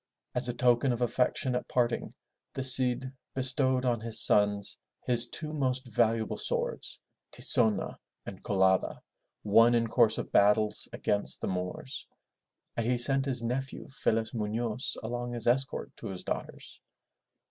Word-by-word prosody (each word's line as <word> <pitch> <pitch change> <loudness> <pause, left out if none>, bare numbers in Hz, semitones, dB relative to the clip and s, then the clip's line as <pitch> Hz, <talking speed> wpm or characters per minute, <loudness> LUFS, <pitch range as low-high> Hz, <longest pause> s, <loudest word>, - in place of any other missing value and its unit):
As 125 0 +1
a - - -2
token 125 +1 +2
of 120 - -2
affection 125 +1 0
at 125 - -3
parting, 120 -2 -1 0.4
the 135 - -3
Cid 130 0 +5 0.2
bestowed 130 0 0
on 120 -3 0
his 115 -1 -1
sons 105 -1 +3 0.3
his 120 -1 +2
two 155 +4 -6
most 130 -3 -1
valuable 115 -1 0
swords, - - -3 0.3
Ti - - -8
zo'na 110 -3 +2 0.3
and - - -9
Co 100 - -2
la'da, 95 0 +2 0.4
won 115 +3 +5
in 115 -1 +2
course 115 -1 +2
of - - -5
battles 105 +1 +2
against 105 - 0
the - - -4
Moors, 90 -1 -5 0.7
and 115 -1 -2
he 125 0 +1
sent 135 +2 +4
his 125 -4 0
nephew, 135 +3 -4
Felez 115 -4 -1
Munoz, 115 +2 -3
along 120 +1 -4
as 115 - -3
escort 135 +3 -1
to - - -8
his 95 -2 -7
daughters. - - -7
120 Hz, 150 wpm, -29 LUFS, 110-130 Hz, 0.7 s, Cid